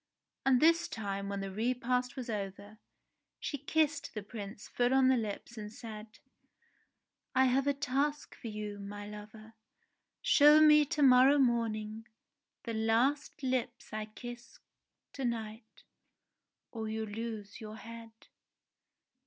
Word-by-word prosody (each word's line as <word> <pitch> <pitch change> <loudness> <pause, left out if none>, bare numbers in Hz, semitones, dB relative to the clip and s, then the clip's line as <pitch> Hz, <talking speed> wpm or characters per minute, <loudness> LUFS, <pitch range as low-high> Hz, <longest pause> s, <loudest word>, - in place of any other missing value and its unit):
And 260 -2 +5
this 330 +3 +4
time 200 -2 -4
when 200 0 -3
the 195 0 -4
repast 250 +4 -1
was 255 -3 -5
over, 205 0 -5 0.6
she 290 - -4
kissed 300 0 0
the 215 - -4
Prince 205 -1 -8
full 245 +2 +1
on 265 -1 +5
the 260 - +5
lips 225 0 -4
and 210 0 -7
said: 220 -1 -9 1.2
"I 260 +1 +5
have 265 +2 +2
a 285 - +3
task 290 +2 -1
for - - -9
you, 210 -1 -5
my 205 +1 -7
lover. 215 +1 -11 0.7
Show 300 -11 +7
me 300 -1 +7
to 290 +1 0
morrow 265 +2 +7
morning 225 -3 0 0.6
the 230 - -4
last 245 +7 +1
lips 255 -3 -2
I 215 0 -3
kiss 240 +3 -10 0.6
to 270 - -5
night 225 -2 -5 0.9
or 220 -2 -4
you 220 0 -2
lose 220 0 -6
your 215 0 -7
head." 230 0 -10
230 Hz, 135 wpm, -32 LUFS, 215-260 Hz, 1.2 s, Show